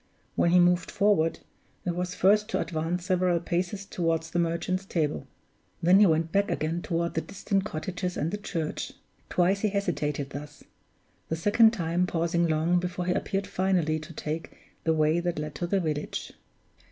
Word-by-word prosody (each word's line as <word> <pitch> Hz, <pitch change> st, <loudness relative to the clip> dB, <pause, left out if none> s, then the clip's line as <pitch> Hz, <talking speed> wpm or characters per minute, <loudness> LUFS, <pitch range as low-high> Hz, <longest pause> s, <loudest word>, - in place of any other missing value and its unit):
When 170 Hz, -, +3 dB
he 180 Hz, +1 st, +6 dB
moved 175 Hz, 0 st, +3 dB
forward, 185 Hz, -6 st, +2 dB, 0.4 s
it 175 Hz, -1 st, -1 dB
was 180 Hz, 0 st, -3 dB
first 210 Hz, +3 st, +4 dB
to -, -, 0 dB
advance 170 Hz, +2 st, -2 dB
several 180 Hz, -2 st, +2 dB
paces 180 Hz, +3 st, -2 dB
toward 165 Hz, -3 st, 0 dB
the 165 Hz, +2 st, -2 dB
Merchant's 170 Hz, +3 st, 0 dB
Table; 155 Hz, -, -2 dB, 0.6 s
then 180 Hz, +3 st, +6 dB
he 210 Hz, -, +7 dB
went 160 Hz, 0 st, +1 dB
back 200 Hz, +2 st, +2 dB
again 165 Hz, +3 st, -1 dB
toward 170 Hz, 0 st, -1 dB
the 160 Hz, -, 0 dB
distant 195 Hz, +1 st, -2 dB
cottages 180 Hz, +1 st, -4 dB
and 160 Hz, +3 st, -1 dB
the 205 Hz, -, -3 dB
church. 165 Hz, -6 st, -3 dB, 0.4 s
Twice 185 Hz, +2 st, +2 dB
he 215 Hz, -, +1 dB
hesitated 150 Hz, -8 st, -2 dB
thus; 145 Hz, +1 st, -8 dB, 0.7 s
the 160 Hz, -, 0 dB
second 205 Hz, +7 st, +5 dB
time 175 Hz, -2 st, 0 dB
pausing 170 Hz, 0 st, +1 dB
long 160 Hz, +3 st, +2 dB
before 180 Hz, 0 st, -3 dB
he 180 Hz, -, +2 dB
appeared 195 Hz, +1 st, -1 dB
finally 180 Hz, -5 st, +1 dB
to 155 Hz, +2 st, -10 dB
take 155 Hz, +1 st, -5 dB, 0.3 s
the 160 Hz, -, +3 dB
way 155 Hz, +2 st, +3 dB
that 175 Hz, -1 st, -2 dB
led 150 Hz, 0 st, -4 dB
to 175 Hz, +5 st, -3 dB
the 195 Hz, +2 st, +2 dB
village. 155 Hz, -4 st, -3 dB
175 Hz, 175 wpm, -27 LUFS, 160-185 Hz, 0.7 s, he